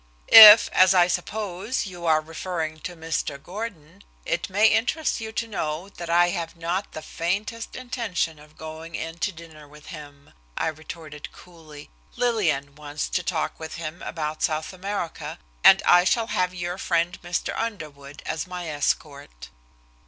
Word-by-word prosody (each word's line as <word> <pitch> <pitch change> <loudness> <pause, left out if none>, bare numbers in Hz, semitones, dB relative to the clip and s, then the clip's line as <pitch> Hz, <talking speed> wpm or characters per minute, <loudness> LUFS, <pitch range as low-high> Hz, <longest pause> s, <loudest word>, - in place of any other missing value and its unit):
"If, 220 -1 +11
as 185 +1 +5
I 175 -1 +6
suppose, 205 +5 -3
you 175 -3 -7
are 155 -1 +4
referring 160 0 -5
to 175 +2 -7
Mr. 160 -3 -3
Gordon, 175 0 -8 0.2
it - - -2
may 205 +3 +3
interest 235 +7 +1
you 220 0 -5
to 230 - -2
know 170 -3 -4
that 170 -3 -9
I 175 +1 +4
have 170 -2 -4
not 170 +4 -3
the 155 - -7
faintest 205 +7 -3
intention 230 -11 -3
of 150 +1 -18
going 160 +1 -8
in 165 +1 -6
to 205 - -1
dinner 160 -3 -13
with 150 +1 -16
him," 145 -2 -12 0.2
I - - 0
retorted 155 -1 -9
coolly. 160 -4 -14 0.2
"Lillian 170 - 0
wants 150 0 -5
to 180 - -1
talk 165 -2 -3
with 160 -1 -7
him 165 0 -7
about 155 -1 -4
South 155 +3 -1
America, 185 -2 -5 0.3
and - - +7
I 175 - +6
shall 225 +5 +1
have 180 0 +1
your 175 +1 -5
friend, 170 +1 -1
Mr. 175 0 -3
Underwood, 150 -10 -6
as 160 - -3
my 180 -1 -6
escort." 140 - -3
170 Hz, 160 wpm, -24 LUFS, 155-190 Hz, 0.3 s, If